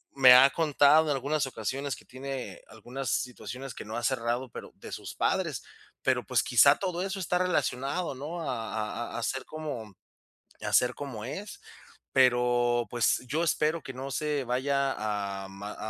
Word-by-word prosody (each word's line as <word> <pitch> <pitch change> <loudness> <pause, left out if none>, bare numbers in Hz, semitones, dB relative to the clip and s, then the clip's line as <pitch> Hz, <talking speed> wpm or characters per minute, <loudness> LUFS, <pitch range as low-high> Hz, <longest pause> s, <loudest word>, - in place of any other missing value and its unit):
me 130 -2 +9
ha 130 +2 +9
contado 150 0 +4
en 150 - 0
algunas 140 +2 0
ocasiones 130 +4 -3
que - - -15
tiene 130 0 -7
algunas 120 +4 -6
situaciones 125 +1 -4
que - - -8
no 110 +2 -6
ha 120 - -3
cerrado, 120 0 -1
pero - - -9
de - - -11
sus - - -7
padres. - - 0 0.4
Pero, - - +1
pues, - - +2
quizá 140 +4 +6
todo 180 -2 -2
eso 195 0 -3
está 180 0 0
relacionado, 150 -2 0
¿no?, 155 +6 -5
a 115 -4 -3
a - - -5
a - - -4
ser 135 +2 -2
como 140 -10 -6 0.7
a - - -3
ser 125 0 +4
como 125 -7 -6
es. 205 - -7 0.5
Pero, 120 -2 +3
pues, 120 0 +2
yo 160 +5 0
espero 160 0 +1
que 130 - -6
no 130 +2 -6
se 150 +1 -1
vaya 135 +2 0
a 100 -2 -3
ma 100 +2 -8
130 Hz, 170 wpm, -29 LUFS, 120-145 Hz, 0.7 s, me